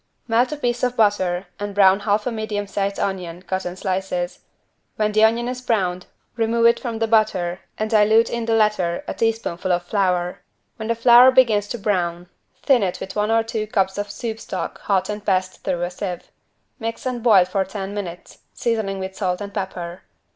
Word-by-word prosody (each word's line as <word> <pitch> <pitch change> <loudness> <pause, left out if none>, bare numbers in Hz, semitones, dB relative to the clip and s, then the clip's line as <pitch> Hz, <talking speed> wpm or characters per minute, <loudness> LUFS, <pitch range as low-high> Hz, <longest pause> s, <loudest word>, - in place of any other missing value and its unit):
Melt 240 +3 +2
a 300 - -3
piece 245 -3 -1
of 250 0 0
butter 195 -4 +2
and 205 -1 -5
brown 195 -1 +5
half 210 0 0
a 250 - -1
medium 215 -2 -3
sized 200 0 -2
onion 180 -2 -3
cut 190 -1 -3
in 175 - -6
slices. 185 -1 -3 0.6
When 215 0 0
the 215 +1 +3
onion 230 +2 +3
is 250 0 -4
browned 185 -7 -1 0.3
remove 230 0 +1
it 235 0 +5
from 235 -3 -4
the 225 - +1
butter 190 -5 +1 0.2
and 215 - -1
dilute 220 +1 +4
in 235 -1 -3
the 225 0 +1
latter 210 -6 +1
a - - -2
teaspoonful 220 -5 -1
of 175 0 +1
flour. 180 -2 0 0.4
When 220 - -5
the 230 - +1
flour 240 +2 +7
begins 230 -6 +4
to 240 - -4
brown, 175 -4 -1 0.3
thin 265 -4 +4
it 185 -3 -1
with 190 - -7
one 210 0 0
or 225 0 +3
two 220 -1 -3
cups 195 -1 0
of 205 0 -3
soup 225 +1 -5
stock - - -5
hot 190 -2 +1
and 210 0 -5
passed 185 -2 -1
through 175 -2 -1
a 175 - -2
sieve. 180 -1 -6 0.5
Mix 230 +1 -5
and 250 -2 -2
boil 205 -6 +6
for 195 +1 0
ten 195 0 -6
minutes, 180 -4 -7 0.2
seasoning 220 -4 -1
with 190 0 -5
salt 180 -3 -1
and 200 -1 -7
pepper. 180 -3 -5
205 Hz, 195 wpm, -22 LUFS, 185-225 Hz, 0.6 s, flour